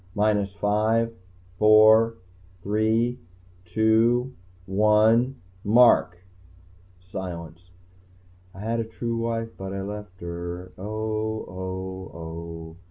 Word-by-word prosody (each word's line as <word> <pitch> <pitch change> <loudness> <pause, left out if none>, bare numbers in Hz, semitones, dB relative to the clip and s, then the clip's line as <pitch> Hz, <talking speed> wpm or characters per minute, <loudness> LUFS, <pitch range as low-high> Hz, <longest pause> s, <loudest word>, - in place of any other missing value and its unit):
"Minus 105 -2 +1
five... 110 +3 +1 0.5
four... 110 +1 +6 0.5
three... 110 +4 +1 0.5
two... 110 +6 +2 0.3
one... 110 +6 +3 0.3
mark!" 110 -5 +5 0.8
Silence. 90 -1 -8 0.9
_I 95 - -9
had 115 +2 -1
a - - 0
true 115 +1 -4
wife 115 0 -2
but 95 0 -5
I 95 0 -4
left 105 -2 -8
her... 85 +1 -6
oh, 110 +2 -3
oh, 95 0 -6
oh. 80 0 -8
105 Hz, 95 wpm, -25 LUFS, 95-110 Hz, 0.9 s, four